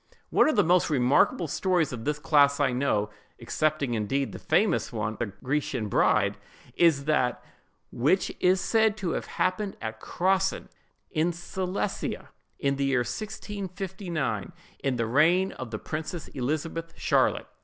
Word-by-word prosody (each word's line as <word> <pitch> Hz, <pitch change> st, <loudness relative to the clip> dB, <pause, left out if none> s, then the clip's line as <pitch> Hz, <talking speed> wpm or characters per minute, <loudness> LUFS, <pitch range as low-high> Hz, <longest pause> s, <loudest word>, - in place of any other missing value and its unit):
One -, -, +5 dB
of 310 Hz, -, +1 dB
the -, -, +5 dB
most 175 Hz, +2 st, +3 dB
remarkable 140 Hz, +4 st, +3 dB
stories 175 Hz, -2 st, +1 dB
of 115 Hz, -2 st, -6 dB
this 150 Hz, 0 st, 0 dB
class 145 Hz, -2 st, +4 dB
I 140 Hz, -3 st, +3 dB
know—excepting 130 Hz, +4 st, -1 dB
indeed 125 Hz, +5 st, -1 dB
the -, -, -8 dB
famous 210 Hz, -7 st, +1 dB
one 110 Hz, -2 st, -2 dB
of -, -, -14 dB
the 120 Hz, -, 0 dB
Grecian 125 Hz, +1 st, -2 dB
bride—is 150 Hz, +7 st, +1 dB
that 130 Hz, -6 st, +1 dB, 0.5 s
which 150 Hz, +11 st, +1 dB
is 185 Hz, +1 st, +3 dB
said 220 Hz, 0 st, +2 dB
to 185 Hz, -5 st, -2 dB
have -, -, -3 dB
happened 195 Hz, +2 st, -1 dB
at 110 Hz, 0 st, -5 dB
Crossen, 190 Hz, +1 st, 0 dB, 0.4 s
in 165 Hz, +1 st, +1 dB
Silesia, 185 Hz, +3 st, -3 dB, 0.3 s
in 140 Hz, 0 st, 0 dB
the 140 Hz, -, 0 dB
year 135 Hz, -2 st, +2 dB
1659, 190 Hz, -, -4 dB, 0.3 s
in 135 Hz, -2 st, -1 dB
the 115 Hz, -1 st, 0 dB
reign 165 Hz, +10 st, +3 dB
of 130 Hz, -, -7 dB
the 110 Hz, -, -4 dB
Princess 155 Hz, +5 st, -5 dB
Elizabeth 155 Hz, +5 st, -3 dB
Charlotte. -, -, +2 dB
155 Hz, 145 wpm, -27 LUFS, 130-185 Hz, 0.5 s, One